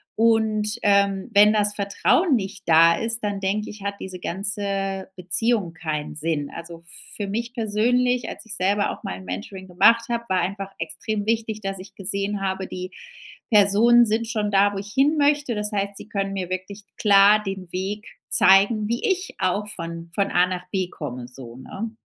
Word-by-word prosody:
Und, 220 Hz, -1 st, +2 dB
ähm, 200 Hz, 0 st, +2 dB
wenn 210 Hz, +1 st, +7 dB
das 210 Hz, -1 st, +2 dB
Vertrauen 205 Hz, -, +2 dB
nicht 200 Hz, -2 st, -4 dB
da 165 Hz, +1 st, +6 dB
ist, 225 Hz, 0 st, -1 dB
dann 205 Hz, -1 st, -2 dB
denke 200 Hz, +2 st, -2 dB
ich, 210 Hz, -, -12 dB
hat 200 Hz, 0 st, -3 dB
diese 185 Hz, -1 st, -7 dB
ganze 195 Hz, 0 st, -3 dB
Beziehung 185 Hz, +1 st, +1 dB
keinen 155 Hz, -3 st, -4 dB
Sinn. 150 Hz, -1 st, -2 dB
Also, 170 Hz, 0 st, -9 dB
f 170 Hz, -, -21 dB, 0.3 s
für 205 Hz, -, -3 dB
mich 235 Hz, +4 st, -3 dB
persönlich 245 Hz, +2 st, +1 dB
als -, -, -8 dB
ich 220 Hz, -1 st, -5 dB
selber 200 Hz, +1 st, +1 dB
auch -, -, -10 dB
mal 90 Hz, -, -5 dB
'n 95 Hz, -, -12 dB
Mentoring 145 Hz, -, -7 dB
gemacht 230 Hz, +6 st, +4 dB
hab 235 Hz, 0 st, -3 dB
war 185 Hz, -1 st, +2 dB
einfach 195 Hz, +2 st, -4 dB
extrem 215 Hz, -2 st, -3 dB
wichtig 225 Hz, -1 st, -1 dB
dass 195 Hz, -1 st, -4 dB
ich 185 Hz, -, -12 dB
gesehen 200 Hz, +1 st, -2 dB
habe 190 Hz, 0 st, -2 dB
die 185 Hz, 0 st, -6 dB, 0.6 s
Personen 215 Hz, +4 st, +6 dB
sind 225 Hz, +1 st, -1 dB
schon 215 Hz, -2 st, -1 dB
da, 200 Hz, +1 st, +4 dB
wo -, -, -5 dB
ich 205 Hz, +1 st, -7 dB
hinmöchte. 290 Hz, -1 st, +2 dB
Das 210 Hz, 0 st, -2 dB
heißt 200 Hz, 0 st, -2 dB
sie -, -, -10 dB
können 195 Hz, -1 st, -2 dB
mir 185 Hz, -2 st, -4 dB
wirklich 185 Hz, +3 st, -5 dB
klar 205 Hz, 0 st, +5 dB
den 195 Hz, -3 st, -6 dB
Weg 200 Hz, +4 st, -4 dB, 0.2 s
zeigen 200 Hz, +3 st, +4 dB
wie 235 Hz, +1 st, -2 dB
ich 380 Hz, 0 st, -1 dB
auch 195 Hz, +2 st, 0 dB
von 170 Hz, -4 st, -6 dB
von 200 Hz, -1 st, +1 dB
A 180 Hz, +1 st, +4 dB
nach 180 Hz, -1 st, -5 dB
B 190 Hz, -2 st, -1 dB
komme 125 Hz, -7 st, -7 dB
so, 125 Hz, -2 st, -11 dB
ne? 200 Hz, -, -6 dB
200 Hz, 185 wpm, -23 LUFS, 185-215 Hz, 0.6 s, wenn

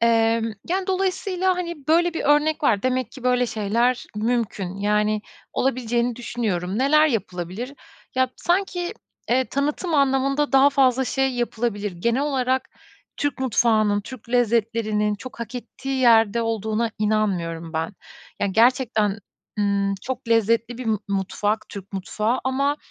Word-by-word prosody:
Emm, 230 Hz, -1 st, +2 dB, 0.2 s
yani, 370 Hz, +2 st, 0 dB
dolayısıyla, 375 Hz, -1 st, 0 dB
hani, 340 Hz, -5 st, -5 dB
böyle 340 Hz, +2 st, +3 dB
bir -, -, -3 dB
örnek 300 Hz, +2 st, +3 dB
var. 205 Hz, -7 st, +2 dB
Demek 255 Hz, -1 st, 0 dB
ki 260 Hz, -, -11 dB
böyle 250 Hz, 0 st, +2 dB
şeyler 235 Hz, +3 st, 0 dB
mümkün. 210 Hz, -4 st, -1 dB
Yani, 210 Hz, +1 st, +1 dB, 0.3 s
olabileceğini 240 Hz, -2 st, 0 dB
düşünüyorum. 210 Hz, -6 st, -2 dB
Neler 305 Hz, +4 st, +5 dB
yapılabilir? 205 Hz, -, -3 dB, 0.4 s
Ya 260 Hz, 0 st, +3 dB
b -, -, -21 dB
sanki, 355 Hz, +1 st, -1 dB, 0.4 s
eee, 260 Hz, +2 st, +3 dB
tanıtım 295 Hz, +6 st, -1 dB
anlamında 275 Hz, +1 st, +2 dB
daha 270 Hz, +1 st, +6 dB
fazla 265 Hz, -2 st, +3 dB
şey 270 Hz, +1 st, +1 dB
yapılabilir. 225 Hz, -4 st, -2 dB
Genel 235 Hz, +10 st, 0 dB
olarak 260 Hz, -2 st, 0 dB, 0.5 s
Türk 290 Hz, -2 st, -1 dB
mutfağının, 215 Hz, -4 st, +2 dB
Türk 230 Hz, +2 st, -11 dB
lezzetlerinin 225 Hz, -3 st, +1 dB
çok 240 Hz, +3 st, -10 dB
hak 235 Hz, +1 st, -6 dB
ettiği 265 Hz, +2 st, -4 dB
yerde 230 Hz, -2 st, +5 dB
olduğuna 225 Hz, 0 st, -1 dB
inanmıyorum 180 Hz, -6 st, -1 dB
ben. 160 Hz, +4 st, -2 dB, 0.5 s
Ya -, -, +2 dB
gerçekten, 220 Hz, -1 st, +2 dB, 0.4 s
ımm, 200 Hz, -1 st, +1 dB
çok 255 Hz, -1 st, -5 dB
lezzetli 230 Hz, +1 st, +2 dB
bir 255 Hz, -, -5 dB
m 220 Hz, -, +2 dB
mutfak 200 Hz, +2 st, -1 dB
Türk 200 Hz, 0 st, -9 dB
mutfağı 210 Hz, +5 st, -1 dB
ama, 275 Hz, +2 st, +1 dB
235 Hz, 135 wpm, -23 LUFS, 210-270 Hz, 0.5 s, daha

